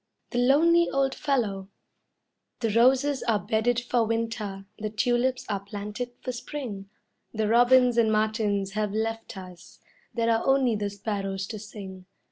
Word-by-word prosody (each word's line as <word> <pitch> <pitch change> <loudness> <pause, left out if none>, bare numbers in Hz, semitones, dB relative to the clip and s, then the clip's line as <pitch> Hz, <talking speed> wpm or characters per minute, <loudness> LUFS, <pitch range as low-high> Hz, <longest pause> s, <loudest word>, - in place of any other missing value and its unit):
THE 245 - 0
LONELY 330 +7 +4
OLD 270 -1 +1
FELLOW 210 -9 -1 0.9
The 225 -2 +1
roses 265 +5 +3
are 225 -3 +1
bedded 225 +3 0
for 240 -1 +1
winter, 225 -3 -3
the 215 0 -3
tulips 245 +5 0
are 205 -2 -1
planted 205 +4 -6
for 255 - -3
spring; 240 -6 -6 0.5
The 215 -1 0
robins 245 +1 +5
and 220 -2 +3
martins 215 -2 0
have 210 0 -2
left 225 0 -3
us; 180 -2 -12 0.3
there 230 -1 +1
are 225 - +1
only 270 -4 +3
the 205 -1 -2
sparrows 195 -1 -3
to 215 - -5
sing. 190 -3 -10
225 Hz, 145 wpm, -26 LUFS, 205-245 Hz, 0.9 s, robins